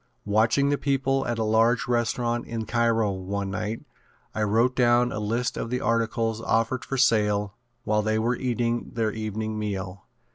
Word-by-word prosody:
Watching 110 Hz, +7 st, +2 dB
the 145 Hz, -, 0 dB
people 135 Hz, -1 st, 0 dB
at 120 Hz, -1 st, -1 dB
a 110 Hz, -, 0 dB
large 115 Hz, +3 st, +2 dB
restaurant 120 Hz, 0 st, 0 dB
in 115 Hz, -1 st, -4 dB
Cairo, 115 Hz, -3 st, +1 dB
one 95 Hz, +1 st, -4 dB
night, 105 Hz, +3 st, -3 dB, 0.5 s
I 110 Hz, -, -3 dB
wrote 115 Hz, +4 st, +2 dB
down 120 Hz, 0 st, +3 dB
a 105 Hz, -, -3 dB
list 115 Hz, +3 st, -1 dB
of -, -, -3 dB
the 125 Hz, +1 st, -1 dB
articles 115 Hz, -1 st, 0 dB
offered 115 Hz, +2 st, 0 dB
for 135 Hz, -, -4 dB
sale 105 Hz, -5 st, +2 dB, 0.3 s
while 105 Hz, 0 st, +1 dB
they 110 Hz, +1 st, 0 dB
were 115 Hz, +3 st, +1 dB
eating 120 Hz, -2 st, -2 dB
their 110 Hz, -2 st, 0 dB
evening 110 Hz, 0 st, -4 dB
meal. 100 Hz, -2 st, -5 dB
115 Hz, 170 wpm, -25 LUFS, 105-120 Hz, 0.5 s, down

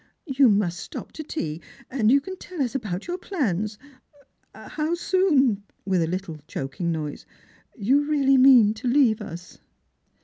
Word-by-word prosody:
You 270 Hz, -4 st, +4 dB
must 200 Hz, -4 st, +1 dB
stop -, -, -8 dB
to 310 Hz, -, -7 dB
tea, 165 Hz, -, -4 dB, 0.3 s
and 235 Hz, -5 st, +1 dB
you 275 Hz, +3 st, +5 dB
can 375 Hz, +6 st, -7 dB
tell 360 Hz, -1 st, -10 dB
us 255 Hz, -4 st, 0 dB
about 205 Hz, -8 st, -4 dB
your 355 Hz, +1 st, -4 dB
plans; 215 Hz, -, -2 dB, 0.8 s
how 310 Hz, +2 st, -3 dB
soon," 300 Hz, -, +2 dB, 0.2 s
with 190 Hz, -3 st, +1 dB
a 165 Hz, -, +1 dB
little 180 Hz, -2 st, -4 dB
choking 140 Hz, +6 st, -3 dB
noise, 155 Hz, -3 st, -5 dB, 0.3 s
" -, -, -31 dB
you 265 Hz, +7 st, +2 dB
really 275 Hz, -3 st, +3 dB
mean 250 Hz, -5 st, +7 dB
to 220 Hz, +3 st, -6 dB
leave 240 Hz, -4 st, +3 dB
us." 180 Hz, -4 st, -9 dB
240 Hz, 160 wpm, -24 LUFS, 190-285 Hz, 0.8 s, mean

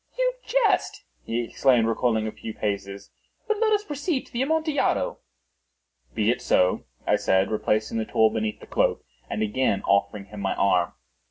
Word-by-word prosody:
"You -, -, +2 dB
jest," 460 Hz, -2 st, +1 dB, 0.2 s
he 120 Hz, +1 st, -1 dB
exclaimed, 120 Hz, -1 st, +2 dB
recoiling 115 Hz, -1 st, +1 dB
a 110 Hz, -, -3 dB
few 110 Hz, 0 st, -8 dB
paces. 100 Hz, -1 st, -4 dB, 0.4 s
"But 435 Hz, -2 st, 0 dB
let 445 Hz, -1 st, +2 dB
us 415 Hz, -1 st, +2 dB
proceed 290 Hz, -3 st, -2 dB
to -, -, -21 dB
the 240 Hz, -, -1 dB
Amontillado." 310 Hz, +1 st, 0 dB, 1.0 s
"Be 110 Hz, +2 st, +2 dB
it 125 Hz, -, -3 dB
so," 90 Hz, 0 st, +2 dB, 0.2 s
I -, -, +3 dB
said, 95 Hz, +2 st, +2 dB
replacing 110 Hz, +1 st, 0 dB
the 110 Hz, -, -1 dB
tool 110 Hz, 0 st, +3 dB
beneath 110 Hz, -1 st, -2 dB
the -, -, -10 dB
cloak, -, -, 0 dB, 0.3 s
and 110 Hz, -, -1 dB
again 110 Hz, -1 st, 0 dB
offering 100 Hz, 0 st, +1 dB
him 105 Hz, +1 st, -10 dB
my 95 Hz, -, -1 dB
arm. 90 Hz, -3 st, +2 dB
110 Hz, 170 wpm, -25 LUFS, -, 1.0 s, I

